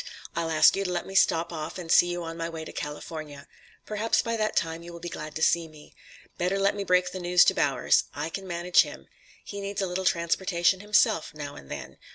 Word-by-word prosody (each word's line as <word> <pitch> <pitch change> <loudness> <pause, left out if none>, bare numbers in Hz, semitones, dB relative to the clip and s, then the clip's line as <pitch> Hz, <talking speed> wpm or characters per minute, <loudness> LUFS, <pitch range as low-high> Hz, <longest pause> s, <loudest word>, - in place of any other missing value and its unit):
I'll 165 0 -1
ask 155 -1 +5
you 195 - -1
to 180 - -2
let 175 -1 -2
me 195 - -9
stop 170 -3 +3
off 155 +2 -5
and 170 -3 -5
see 175 - +6
you 175 0 -3
on 165 0 -6
my 165 0 -3
way 160 -1 -7
to - - -8
California. 150 -1 -7 0.4
Perhaps 215 +2 0
by 230 0 -1
that 215 -1 -1
time 165 0 -1
you 170 0 -10
will 170 - -9
be 175 +1 -6
glad 150 0 -7
to 160 - -1
see 170 -1 +3
me. 155 -1 -16 0.5
Better 180 +3 +1
let 195 0 +2
me 200 -1 -3
break 180 -1 +2
the 185 - -6
news 180 0 +5
to - - +4
Bowers. - - +2
I 145 +3 -4
can 190 +3 -6
manage 175 0 +3
him. - - -7 0.4
He 200 -1 -6
needs 200 0 -4
a 195 - +1
little 185 +1 -3
transportation 175 +1 +1
himself 205 -6 +2
now 145 -1 -6
and 70 - -13
then. - - -7
175 Hz, 235 wpm, -27 LUFS, 160-190 Hz, 0.5 s, see